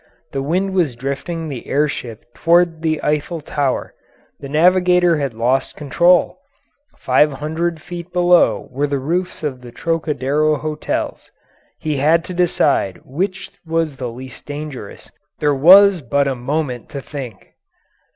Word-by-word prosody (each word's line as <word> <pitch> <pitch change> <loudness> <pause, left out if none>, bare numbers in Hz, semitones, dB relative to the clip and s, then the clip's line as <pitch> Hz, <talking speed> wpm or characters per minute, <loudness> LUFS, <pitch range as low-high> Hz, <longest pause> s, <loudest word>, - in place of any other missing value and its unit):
The 135 - -2
wind 185 +7 -1
was 165 -10 +1
drifting 140 +6 -4
the 135 -6 -7
air 150 +2 +2
ship 115 -6 -7
toward 170 +1 +2
the 155 -1 0
Eiffel 150 +3 -1
Tower; 145 -3 -2 0.5
the 140 - -8
navigator 180 +2 +4
had 140 -5 -3
lost 125 +4 0
control; 170 - +2 0.6
500 150 +5 0
feet 175 +1 -8
below 175 0 +3
were 140 +3 -1
the 140 0 -1
roofs 170 +6 -3
of 135 -4 -3
the 120 -1 -11
Trocadero 155 -1 0
Hotels; 155 +1 -4 0.5
he 155 -2 -2
had 160 +5 +3
to 185 - -6
decide 150 - +1
which 190 +6 -3
was 165 -4 -1
the 125 -2 -4
least 125 +1 -11
dangerous; 145 -7 -8 0.3
there 150 -1 +1
was 185 +6 +7
but 140 +2 +1
a 135 - 0
moment 125 0 -3
to 140 - -6
think. 130 -7 -8
150 Hz, 140 wpm, -19 LUFS, 135-170 Hz, 0.6 s, was